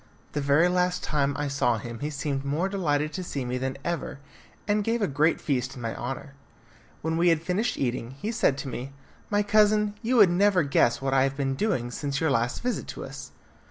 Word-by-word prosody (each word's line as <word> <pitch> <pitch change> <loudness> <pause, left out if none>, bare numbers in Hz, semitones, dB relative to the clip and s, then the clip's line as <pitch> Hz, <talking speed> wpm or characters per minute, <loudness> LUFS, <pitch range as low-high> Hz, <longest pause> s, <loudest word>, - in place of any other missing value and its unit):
The 145 - -2
very 145 +5 +4
last 180 0 +1
time 140 -2 0
I 145 0 -1
saw 130 -4 +1
him 115 +1 -7
he 150 - -2
seemed 140 -2 -3
more 150 +7 0
delighted 155 -6 0
to 185 - -4
see 140 -7 -4
me 125 +1 -2
than 130 +1 -3
ever, 170 -3 -3 0.5
and 210 0 +2
gave 230 +3 0
a 205 - +1
great 150 +3 +2
feast 135 -2 -1
in 125 - -9
my 115 - -3
honour. 135 +2 -5 0.7
When 160 +1 0
we 175 +1 +4
had 165 -1 +2
finished 190 +7 0
eating, 125 -1 -2
he 210 +3 -2
said 220 - +2
to 140 - -5
me, 130 +1 -6 0.4
"My 205 0 +2
cousin, 210 0 +3
you 240 +2 0
would 205 -7 +7
never 190 -1 +4
guess 130 -3 +2
what 135 0 0
I 135 - +4
have 135 +1 0
been 135 -1 0
doing 130 - -1
since 140 +1 -2
your 160 -3 +1
last 120 - 0
visit 250 0 -2
to - - -6
us! - - -8
145 Hz, 220 wpm, -26 LUFS, 135-185 Hz, 0.7 s, would